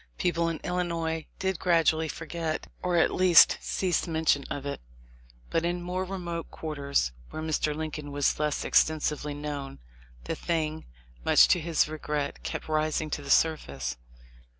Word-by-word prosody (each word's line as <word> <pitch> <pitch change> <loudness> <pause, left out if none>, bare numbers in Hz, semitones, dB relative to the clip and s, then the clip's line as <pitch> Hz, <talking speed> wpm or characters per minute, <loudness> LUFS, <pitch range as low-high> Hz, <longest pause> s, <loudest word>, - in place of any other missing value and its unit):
People 170 -1 +1
in 165 - -3
Illinois 165 -3 -2
did 190 -3 -1
gradually 160 -2 +3
forget 165 0 -4 0.2
or, 180 -1 +1
at 165 - +3
least, 180 -3 +6
cease 180 -2 0
mention 160 -3 +2
of 140 -1 -5
it, 140 - -4 0.7
but 165 - +1
in 175 +1 0
more 180 +1 -2
remote 175 -3 -5
quarters 140 - -1 0.2
where - - -6
Mr. 155 -1 0
Lincoln 155 -2 -5
was 145 0 +1
less 150 -1 0
extensively 150 -2 +2
known, 145 -2 -5 0.5
the - - -3
thing, 160 -2 -2 0.4
much - - +6
to 180 - +4
his 165 -1 +1
regret, 150 - -3
kept - - -5
rising 155 0 0
to 145 - -2
the 140 - -9
surface. 70 - +1
155 Hz, 150 wpm, -28 LUFS, 150-170 Hz, 0.7 s, least